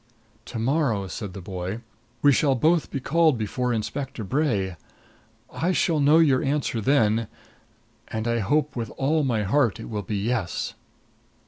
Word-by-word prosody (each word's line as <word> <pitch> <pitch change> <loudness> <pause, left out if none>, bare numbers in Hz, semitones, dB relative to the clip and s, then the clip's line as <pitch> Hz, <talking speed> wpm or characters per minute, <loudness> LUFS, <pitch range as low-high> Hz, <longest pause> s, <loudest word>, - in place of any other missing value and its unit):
"To 120 - -7
morrow," 120 -4 +1
said 95 0 -6
the 95 - -8
boy, 95 +4 -5 0.4
"we 145 - +7
shall 140 -1 +3
both 160 +5 +2
be 140 - -3
called 160 0 +3
before 125 +3 -1
Inspector 120 +2 -3
Bray. 105 - 0 0.8
I 180 +3 0
shall 165 -3 +2
know 145 +2 +5
your 145 -6 +4
answer 135 -5 -1
then 115 -3 +2 0.8
and 110 +1 -3
I 115 0 +1
hope 145 +8 0
with 115 -3 -3
all 150 +3 +1
my 115 -6 0
heart 120 +2 +2
it - - -8
will 105 -1 -2
be 100 +2 -3
yes." 110 -3 -2
125 Hz, 155 wpm, -25 LUFS, 105-145 Hz, 0.8 s, we